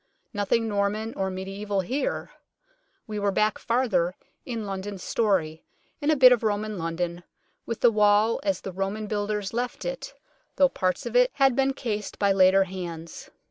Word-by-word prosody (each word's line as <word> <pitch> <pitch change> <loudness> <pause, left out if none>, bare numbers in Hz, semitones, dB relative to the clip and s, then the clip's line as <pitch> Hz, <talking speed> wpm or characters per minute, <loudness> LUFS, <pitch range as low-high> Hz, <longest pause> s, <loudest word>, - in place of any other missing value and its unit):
Nothing 215 +3 +1
Norman 210 +2 -1
or 190 0 -1
mediaeval 195 +2 -3
here. 275 - -3 0.7
We 210 -1 -4
were 200 0 +1
back 215 +2 +1
farther 200 -8 +1 0.3
in 230 -4 -4
London's 195 -1 -5
story, 180 -8 0 0.4
in 290 - 0
a 310 - +5
bit 255 -2 +8
of 245 - +4
Roman 215 -2 -1
London, 170 +1 -3 0.4
with 230 - -4
the 240 - +6
wall 210 +1 +3
as 195 -2 -1
the 190 - -6
Roman 195 +3 -3
builders 205 -1 -2
left 245 +1 -3
it, - - -5 0.4
though 275 - +5
parts 185 -5 -1
of 235 0 -5
it 250 0 +5
had 270 -3 +3
been 270 0 +2
cased 210 -5 -4
by 200 -1 +2
later 195 0 +5
hands. 175 -3 -7
205 Hz, 165 wpm, -26 LUFS, 190-230 Hz, 0.7 s, bit